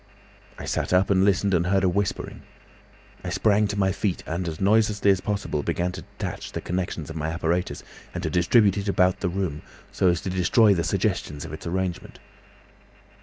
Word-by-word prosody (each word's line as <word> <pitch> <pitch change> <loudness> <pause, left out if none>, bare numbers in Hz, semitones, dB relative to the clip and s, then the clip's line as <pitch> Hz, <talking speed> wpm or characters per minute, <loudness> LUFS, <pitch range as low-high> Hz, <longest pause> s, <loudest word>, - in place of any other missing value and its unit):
I - - -7
sat - - -1
up 95 +2 +3
and 95 -1 +4
listened 100 0 +2
and 85 0 +2
heard 95 +1 +2
a - - +4
whispering. 95 +2 -2 0.8
I - - -4
sprang 105 0 +2
to 100 0 -4
my 95 -1 +2
feet 95 -1 -2
and 85 +2 -3
as 80 -1 -5
noiselessly 105 0 +3
as 95 -1 +1
possible 100 -7 -2
began 90 +4 -1
to - - -8
detach - - -7
the - - -3
connections 85 -3 -3
of - - -9
my 80 -1 -2
apparatus, 85 +2 -1 0.3
and 90 - -5
to 80 - -2
distribute 100 +4 +4
it 100 - -5
about 90 -1 +2
the 90 - -1
room, 85 -5 -3 0.3
so 95 - +1
as 85 -2 +3
to 95 - -4
destroy 100 +4 +4
the 85 -3 0
suggestions 75 -1 -1
of - - -8
its 80 - -7
arrangement. 90 0 -3
95 Hz, 195 wpm, -25 LUFS, 85-100 Hz, 0.8 s, and